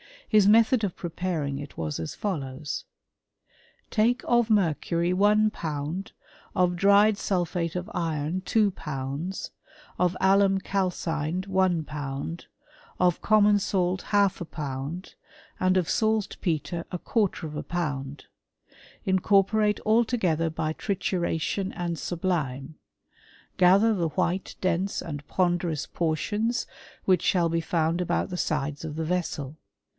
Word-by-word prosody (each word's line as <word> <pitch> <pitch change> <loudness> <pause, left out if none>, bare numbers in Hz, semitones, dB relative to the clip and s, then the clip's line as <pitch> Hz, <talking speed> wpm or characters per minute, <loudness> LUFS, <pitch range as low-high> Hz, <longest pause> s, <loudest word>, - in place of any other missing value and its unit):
His 210 -3 +5
method 220 0 +5
preparing 165 -5 -3
it 145 -1 -9
was 75 -2 -3
as 80 - -5
follows: 145 -7 -4 1.1
Take 235 +4 +2
of 240 -1 +3
mercury 175 -3 +1
i 210 +3 +4
pound, 155 +2 -4 0.4
of 180 -1 +2
dried 200 +2 +5
sulphate 175 -4 -1
of 180 +5 -4
iron 165 +1 -1
two 210 -1 +2
pounds, 150 +3 -5 0.5
of 180 +1 +2
al 195 +1 +5 0.2
calcined 180 -3 -2
one 185 -4 +2
pound, 145 +2 -5 0.5
of 180 -2 +2
common 210 -1 +5
salt 185 -2 0
half 200 -2 +2
a - - -3
pou 160 - -8 0.3
1^1 180 +4 -8 0.5
and 185 0 +3
of 180 -3 +1
saltpetre 185 -6 -1
a 180 - -2
quarter 200 -2 0
of 155 -1 -6
a - - -2
pound: 145 -5 -4 0.8
incorpoi 200 +2 +3
altogether 215 -8 +2
by 160 0 -2
trituration 185 0 -1
and 170 -2 -3
sublime; 155 -5 -2 0.8
gather 195 +5 +5
white, 175 +1 -1
dense, 185 +2 0
and 145 -3 -7
ponderous 175 -4 0
portions 205 +8 -1 0.4
which 185 -1 +3
shall 175 -4 +2
found 165 +1 0
about 180 - 0
the 180 - -4
sides 150 -2 -2
of 150 -2 -5
the 160 0 -2
vessel. 155 -4 -2
180 Hz, 120 wpm, -26 LUFS, 160-195 Hz, 1.1 s, His